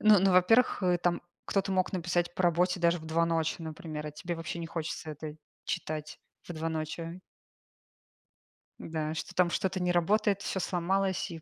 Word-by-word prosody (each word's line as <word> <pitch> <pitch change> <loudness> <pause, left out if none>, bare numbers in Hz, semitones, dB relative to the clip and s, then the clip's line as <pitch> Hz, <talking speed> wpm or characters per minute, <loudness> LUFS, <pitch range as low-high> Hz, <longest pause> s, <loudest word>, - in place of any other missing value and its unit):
Ну 215 -1 +7
ну, 195 +1 +4
во-первых, 205 +5 +5
э, 180 -1 +3
там 175 0 0 0.2
кто-то 195 -1 0
мог 185 0 +1
написать 175 -1 0
по 185 - -1
работе 175 +1 +2
даже 170 0 +3
в 160 - -10
2 165 +1 +2
ночи, 165 -1 0
например, 160 -2 -6
а - - -4
тебе 170 +3 -4
вообще 165 +1 -5
не 165 - -4
хочется 160 -1 -4
это 150 +1 -7 0.3
читать 150 -1 -4 0.3
в 175 - -5
2 160 0 -2
ночи. 165 +2 -4 1.6
Да, 155 -1 -3
что 175 +3 -5
там 180 -1 +4
что-то 185 +1 -1
не 180 0 +2
работает, 200 +3 +2
всё 190 - -2
сломалось, 190 +1 0
и 165 -1 -7
175 Hz, 180 wpm, -30 LUFS, 160-185 Hz, 1.6 s, Ну